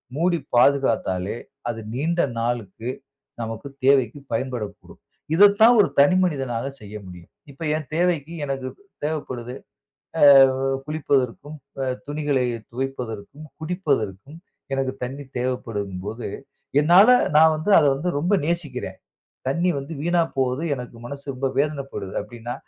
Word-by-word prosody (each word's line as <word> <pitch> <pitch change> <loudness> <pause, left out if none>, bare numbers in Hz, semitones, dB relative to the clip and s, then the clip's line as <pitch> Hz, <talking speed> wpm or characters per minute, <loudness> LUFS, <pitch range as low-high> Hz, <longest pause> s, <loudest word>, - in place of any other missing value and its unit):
மூடி 170 +3 +2 0.2
பாதுகாத்தாலே 115 -8 +2 0.3
அது 115 -1 -3
நீண்ட 165 +7 -1 0.2
நாளுக்கு 115 -1 -3 0.5
நமக்கு 115 +3 -5 0.2
தேவைக்கு 135 -1 +3
பயன்படக்கூடும். 120 -3 -5 0.3
இதத்தான் 205 +5 +7
ஒரு 200 - +5
தனி 145 +6 +6
மனிதனாக 135 -7 -1
செய்ய 105 0 -10
முடியும். 90 -2 -12 0.2
இப்ப 140 +4 -9
என் 155 -4 -8
தேவைக்கு 170 -2 0
எனக்கு 135 -2 -3 0.4
தேவப்படுது, 130 -5 -4 0.7
ஆ - - +2 0.6
குளிப்பதற்கும், 145 -1 -1 0.3
அ - - +1 0.2
துணிகளை 145 -3 0 0.3
துவைப்பதற்கும், 130 +2 -5
குடிப்பதற்கும் 145 - -2 0.4
எனக்கு 135 -1 -1
தண்ணீ 140 +3 -6 0.2
தேவப்படுதும் 105 -7 -3
போது, 110 +3 -5 0.5
என்னால 180 +9 +7 0.3
நான் 160 0 +6
வந்து 155 +7 -2
அத - - +4
வந்து 160 +6 -3
ரொம்ப 180 +7 +2
நேசிக்கிறேன். 145 - -3 0.5
தண்ணீ 170 +6 +1
வந்து 140 +4 -7
வீணா 175 +1 +2 0.2
போகுது 130 +4 0
எனக்கு 125 -2 -8
மனசு 140 +2 -8
ரொம்ப 130 +1 -2
வேதனப்படுது 140 -9 -2
அப்டின்னா, 120 +2 -7
135 Hz, 120 wpm, -23 LUFS, 120-155 Hz, 0.7 s, இதத்தான்